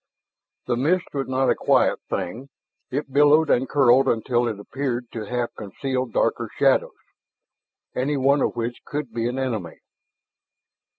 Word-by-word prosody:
The -, -, 0 dB
mist 165 Hz, +9 st, 0 dB
was 135 Hz, -1 st, -2 dB
not 130 Hz, 0 st, +2 dB
a -, -, +2 dB
quiet -, -, +2 dB
thing; 125 Hz, +10 st, -4 dB, 0.4 s
it 135 Hz, 0 st, -4 dB
billowed 150 Hz, +2 st, +5 dB
and 130 Hz, +1 st, +2 dB
curled 135 Hz, -2 st, +4 dB
until 120 Hz, +1 st, +1 dB
it 110 Hz, -3 st, -4 dB
appeared 125 Hz, +2 st, -3 dB
to 110 Hz, -2 st, -5 dB
half 120 Hz, 0 st, -2 dB
conceal 130 Hz, +6 st, -3 dB
darker 115 Hz, -, 0 dB
shadows, -, -, +2 dB, 1.0 s
any 140 Hz, +3 st, 0 dB
one 140 Hz, +1 st, +3 dB
of -, -, 0 dB
which 120 Hz, +1 st, -4 dB
could 145 Hz, -5 st, -5 dB
be 115 Hz, 0 st, -1 dB
an 125 Hz, +2 st, -3 dB
enemy. 110 Hz, -11 st, -3 dB
130 Hz, 145 wpm, -23 LUFS, 120-140 Hz, 1.0 s, billowed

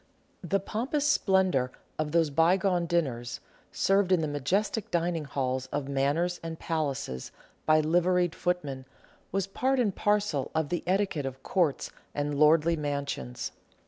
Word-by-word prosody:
The 195 Hz, +3 st, +1 dB
pompous 255 Hz, +9 st, -2 dB
splendour 190 Hz, -, +2 dB, 0.3 s
of 155 Hz, -1 st, -1 dB
those 165 Hz, -2 st, +2 dB
bygone 175 Hz, +3 st, +3 dB
dinners, 125 Hz, -9 st, -1 dB, 0.3 s
served 195 Hz, -1 st, +2 dB
in 180 Hz, -3 st, +4 dB
the 155 Hz, -, 0 dB
majestic 185 Hz, -, -1 dB
dining 170 Hz, -2 st, 0 dB
halls 130 Hz, -2 st, -2 dB
of 140 Hz, +1 st, -3 dB
Manors 145 Hz, +6 st, 0 dB
and 165 Hz, -1 st, -5 dB
Palaces, 140 Hz, -, -3 dB, 0.4 s
by 155 Hz, 0 st, +5 dB
liveried 175 Hz, +2 st, +2 dB
footmen, 145 Hz, -7 st, -2 dB, 0.5 s
was 195 Hz, 0 st, 0 dB
part 260 Hz, +7 st, 0 dB
and 210 Hz, -6 st, +1 dB
parcel 205 Hz, -9 st, +1 dB
of 160 Hz, -2 st, 0 dB
the 175 Hz, -, -1 dB
etiquette 185 Hz, -7 st, +1 dB
of 130 Hz, 0 st, -8 dB
Courts 170 Hz, -7 st, 0 dB, 0.2 s
and 145 Hz, 0 st, -1 dB
lordly 160 Hz, +2 st, +5 dB
mansions. 140 Hz, -, -3 dB
165 Hz, 140 wpm, -28 LUFS, 140-185 Hz, 0.5 s, by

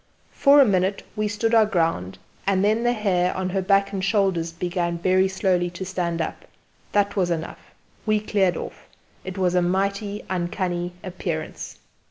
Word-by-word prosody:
For 285 Hz, 0 st, +5 dB
a 275 Hz, -, +8 dB
minute 190 Hz, -2 st, +1 dB
we 215 Hz, 0 st, 0 dB
stood 210 Hz, +2 st, -1 dB
our 220 Hz, -2 st, +6 dB
ground, 165 Hz, -, -1 dB, 0.3 s
and 195 Hz, 0 st, +3 dB
then 215 Hz, +2 st, +2 dB
the 240 Hz, 0 st, +2 dB
hair 185 Hz, -6 st, 0 dB
on 185 Hz, 0 st, -1 dB
her 195 Hz, +1 st, 0 dB
back 195 Hz, +1 st, +2 dB
and 190 Hz, -1 st, -2 dB
shoulders 190 Hz, -5 st, +1 dB
began 170 Hz, 0 st, -2 dB
very 185 Hz, +2 st, +3 dB
slowly 185 Hz, -2 st, 0 dB
to 180 Hz, +2 st, -7 dB
stand 175 Hz, -3 st, -2 dB
up. -, -, -6 dB, 0.5 s
That 200 Hz, -1 st, +1 dB
was 185 Hz, -3 st, +1 dB
enough: 165 Hz, -1 st, -5 dB, 0.3 s
we 215 Hz, 0 st, +3 dB
cleared 200 Hz, -4 st, +1 dB
off. -, -, -8 dB, 0.4 s
It 190 Hz, +1 st, -7 dB
was 180 Hz, -2 st, +1 dB
a 180 Hz, -, +3 dB
mighty 200 Hz, +3 st, -1 dB
uncanny 175 Hz, -1 st, -2 dB
appearance. 175 Hz, -4 st, -5 dB
190 Hz, 170 wpm, -23 LUFS, 175-200 Hz, 0.5 s, a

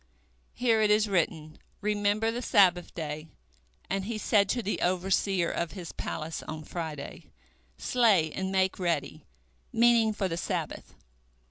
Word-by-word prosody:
Here 230 Hz, -3 st, +2 dB
it 215 Hz, -, +3 dB
is 210 Hz, +1 st, +4 dB
written, 160 Hz, -5 st, -1 dB, 0.2 s
Remember 210 Hz, +1 st, +1 dB
the 240 Hz, +2 st, -4 dB
Sabbath 180 Hz, -6 st, +3 dB
day, 155 Hz, -1 st, -5 dB, 0.6 s
and 195 Hz, -1 st, -2 dB
he 225 Hz, +1 st, -3 dB
said 205 Hz, -2 st, +2 dB
to 240 Hz, +1 st, 0 dB
the 210 Hz, -, -2 dB
overseer 185 Hz, 0 st, +1 dB
of 170 Hz, -1 st, -3 dB
his 180 Hz, -4 st, -7 dB
palace 160 Hz, 0 st, -5 dB
on 155 Hz, 0 st, -7 dB
Friday, 155 Hz, -3 st, -6 dB, 0.5 s
Slay 205 Hz, -11 st, +3 dB
and 190 Hz, 0 st, -3 dB
make 190 Hz, 0 st, +1 dB
ready, 175 Hz, -2 st, -2 dB, 0.4 s
meaning 230 Hz, -1 st, +4 dB
for 205 Hz, -2 st, -1 dB
the 165 Hz, -2 st, -3 dB
Sabbath. -, -, -4 dB
190 Hz, 140 wpm, -28 LUFS, 170-215 Hz, 0.6 s, is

